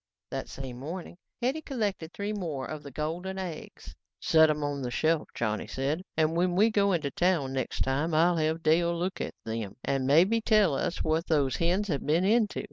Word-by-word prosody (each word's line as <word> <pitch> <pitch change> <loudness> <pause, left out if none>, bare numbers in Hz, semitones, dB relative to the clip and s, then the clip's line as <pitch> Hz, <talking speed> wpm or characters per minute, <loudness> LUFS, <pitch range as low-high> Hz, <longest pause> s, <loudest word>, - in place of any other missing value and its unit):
That 135 -1 -4
same 130 -2 -7
morning, 170 +5 -7 0.3
Hetty 270 +6 0
collected 205 - -3
three 205 +2 -3
more 160 -10 -3
of 155 -1 -6
the 145 - -9
golden 165 +7 -4
eggs. 180 -5 -7 0.3
"Set 160 -1 +5
'em 150 -1 0
on 145 -1 -2
the 125 - -2
shelf," 155 +5 +1
Johnny 110 -2 -2
said, 140 +6 -2 0.2
"and 160 0 +2
when 175 +1 +1
we 215 +4 +4
go 200 -2 +3
into 155 -6 0
town 170 -7 +1
next 130 -2 -3
time 145 +5 0
I'll 170 +2 +4
have 160 +1 0
Dale 170 +2 +3
look 180 +2 -2
at - - -4
them 110 -3 -4
and 135 -1 0
maybe 185 +11 +4
tell 215 -7 +4
us 150 +5 -1
what 160 +2 0
those 145 -5 +1
hens 180 +5 +1
have 145 -4 -1
been 165 +5 +2
into. 215 0 +2
160 Hz, 200 wpm, -28 LUFS, 140-185 Hz, 0.3 s, Set